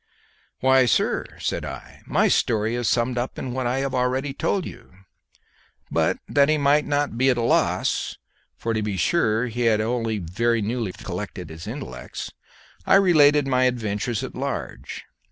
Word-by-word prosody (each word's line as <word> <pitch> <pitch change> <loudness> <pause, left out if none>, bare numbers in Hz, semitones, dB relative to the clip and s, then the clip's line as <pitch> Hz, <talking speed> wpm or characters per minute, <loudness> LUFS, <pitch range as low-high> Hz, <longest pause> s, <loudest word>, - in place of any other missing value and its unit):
"Why, 130 -1 +5
sir," - - +1
said - - -2
I, - - -9
"my - - +3
story 110 +1 +1
is 120 -1 0
summed 120 +1 +1
up 125 - -4
in 125 - -4
what 130 -1 -1
I 125 +2 0
have 135 -1 -2
already 130 +2 0
told 185 +5 -1
you." 120 -1 -11 1.0
But - - +1
that 140 0 +3
he 155 - +3
might 145 +1 +3
not 145 -5 -1
be 130 +1 +4
at 125 - +2
a 120 - 0
loss - - +1 0.4
for 115 - -2
to 110 - 0
be 105 -2 -2
sure 115 - +2
he 120 0 -4
had 110 -2 +3
only 115 0 -1
very 115 +7 0
newly 110 -1 -2
collected 90 -2 -7
his 80 +4 -9
intellects 130 +5 -7 0.5
I - - +4
related 150 -7 +5
my 130 -1 +3
adventures 115 -2 -1
at - - -6
large. - - -5
120 Hz, 170 wpm, -23 LUFS, 110-135 Hz, 1.0 s, Why